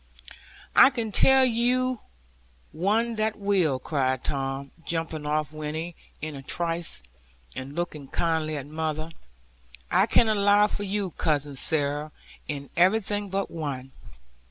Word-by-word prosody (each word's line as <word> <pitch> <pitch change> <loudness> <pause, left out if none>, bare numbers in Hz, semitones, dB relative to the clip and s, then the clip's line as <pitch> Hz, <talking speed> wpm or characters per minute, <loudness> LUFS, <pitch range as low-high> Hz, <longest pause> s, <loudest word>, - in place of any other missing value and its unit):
'I - - +9
can 230 -5 -3
tell 265 +5 +6
you 250 +1 +1 0.7
one 215 +8 +1
that 215 0 0
will,' 190 -9 +2
cried 130 -1 -1
Tom, 135 0 -3
jumping 160 -3 -3
off 150 0 0
Winnie, 155 +2 -5 0.3
in 155 -1 -4
a 135 - -7
trice, 170 - -1 0.5
and 135 +2 -7
looking 155 -5 -4
kindly 160 0 -1
at 135 - -6
mother; 155 +1 -3 0.8
'I - - +5
can 235 - +4
allow 205 -1 +4
for 205 - -3
you, 200 -2 -2
Cousin 145 -4 0
Sarah, 145 +1 +2 0.4
in 140 -2 -5
everything 205 +3 +2
but 195 +1 -2
one. 135 -5 -5
165 Hz, 130 wpm, -26 LUFS, 145-205 Hz, 0.8 s, I